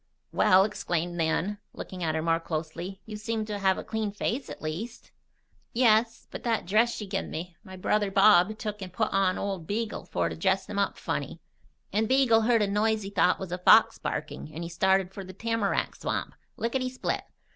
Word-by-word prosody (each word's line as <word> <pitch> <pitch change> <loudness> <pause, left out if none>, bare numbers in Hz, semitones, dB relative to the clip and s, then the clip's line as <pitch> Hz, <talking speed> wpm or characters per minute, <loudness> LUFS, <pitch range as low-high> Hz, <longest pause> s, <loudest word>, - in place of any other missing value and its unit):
"Well!" 185 +1 +5
exclaimed 175 -4 -2
Nan, 175 +5 0
looking 185 -1 -8
at 160 -1 0
her 160 - -1
more 165 0 +2
closely. 165 +4 -5
"You 215 -1 -7
seem 220 0 -2
to 210 -1 -4
have 190 -1 +2
a - - -5
clean 220 -2 -2
face, 235 +6 -3
at - - -8
least." 180 +10 -6 0.6
"Yes. 230 -1 +3
But - - -6
that 230 -2 0
dress 220 +6 +3
she 210 - -5
'gin 195 0 -3
me, 170 +2 -6
my 190 -3 -10
brother 205 +2 +1
Bob 200 +1 +5
took 210 -2 -5
and 185 -1 -6
put 220 +4 -1
on 190 -1 +2
Old 190 -5 -3
Beagle 220 +1 -3
for 85 -1 -1
to 80 - -4
dress 190 - +1
him 200 - -3
up 200 - 0
funny. - - -4 0.5
And 215 +1 +1
Beagle 260 -4 +5
heard 230 -1 +3
a - - +1
noise 215 +1 +1
he 195 - -6
thought 180 -2 +3
was 190 -2 -7
a 180 - -3
fox 220 +5 +6
barking - - -4
and 165 - -4
he 170 - -5
started 190 +2 +2
for 195 - -6
the 185 0 -10
tamarack 225 0 -1
swamp, - - -3 0.2
lickety 255 +2 -1
split. 255 - -2
200 Hz, 200 wpm, -28 LUFS, 180-220 Hz, 0.6 s, fox